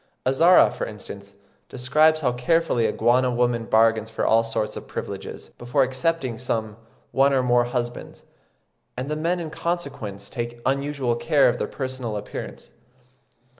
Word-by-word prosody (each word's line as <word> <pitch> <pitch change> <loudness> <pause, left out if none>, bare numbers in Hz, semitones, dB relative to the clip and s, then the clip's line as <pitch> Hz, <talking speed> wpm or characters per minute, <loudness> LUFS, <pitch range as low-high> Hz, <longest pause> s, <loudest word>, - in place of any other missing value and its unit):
Azara, 165 +8 +5
for - - -4
instance, 100 -1 -10 0.3
describes 155 +5 +3
how 125 -4 +2
carefully 125 -1 +1
a - - 0
Guana 125 +4 +2
woman 120 -1 0
bargains 110 0 +3
for 115 - -2
all 115 +1 +4
sorts 110 -2 -3
of - - -8
privileges, - - -7
before 125 +3 +1
accepting 130 -2 -1
some 110 -4 -2 0.4
one 140 +1 +3
or 130 -1 +2
more 120 -1 +3
husbands; 120 0 -5 0.7
and 130 +4 -4
the - - 0
men 170 +4 -1
in 160 -2 -5
consequence 140 - -4
take 120 -1 -5
unusual 140 -2 0
care 145 +3 +3
of - - 0
their - - -1
personal 130 -5 -4
appearance. 105 - -8
125 Hz, 150 wpm, -24 LUFS, 115-140 Hz, 0.7 s, Azara